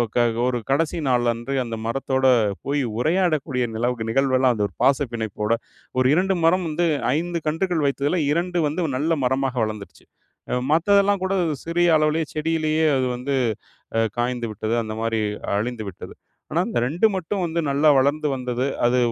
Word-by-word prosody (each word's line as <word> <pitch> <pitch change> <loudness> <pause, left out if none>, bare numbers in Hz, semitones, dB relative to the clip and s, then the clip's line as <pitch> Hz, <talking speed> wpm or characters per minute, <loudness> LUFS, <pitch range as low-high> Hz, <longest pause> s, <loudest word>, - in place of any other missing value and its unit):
க - - +3 0.3
ஒரு 125 -1 0
கடைசி 155 +4 +1
நாள் 125 -2 +2
அன்று 120 +4 -5
அந்த 115 -2 -5
மரத்தோட 130 +2 -1 0.4
போய் 145 +1 0 0.2
உரையாடக்கூடிய 155 -4 +1
நிலவுக்கு 120 0 -1
நிகழ்வெல்லாம் 130 0 +3
அந்த 105 - -1
ஒரு 100 - -20
பாசப்பிணைப்போட 115 -6 0 0.5
ஒரு 130 - +4
2 190 +4 +2
மரம் 180 +2 +3
வந்து 170 +3 0 0.3
5 170 +1 -2
கன்றுகள் 165 +1 0
வைத்ததில 140 +5 0
2 175 +3 0
வந்து 165 +3 -1
நல்ல 155 +5 +1
மரமாக 130 0 0
வளந்துருச்சு. 105 -6 -6 0.5
அ - - 0 0.2
மத்ததெல்லாம் 200 +4 +3
கூட 190 - -1 0.3
சிறிய 175 +1 +2
அளவுலயே 155 +1 +1
செடியிலயே 155 0 0
அது 130 - +1
வந்து 135 +3 -2 0.6
அ - - +3 0.2
காய்ந்துவிட்டது, 120 -3 -2
அந்த 110 -1 -5
மாரி 115 0 0 0.4
அழிந்துவிட்டது. 110 -4 -5 0.4
ஆனா 160 - +1
இந்த - - 0
2 170 - +3
மட்டும் 185 +2 -2
வந்து 170 0 -2
நல்லா 145 +2 +3
வளர்ந்து 145 +3 +1
வந்தது. 125 0 -2 0.2
அது 120 +1 +3
140 Hz, 150 wpm, -23 LUFS, 120-165 Hz, 0.6 s, ஒரு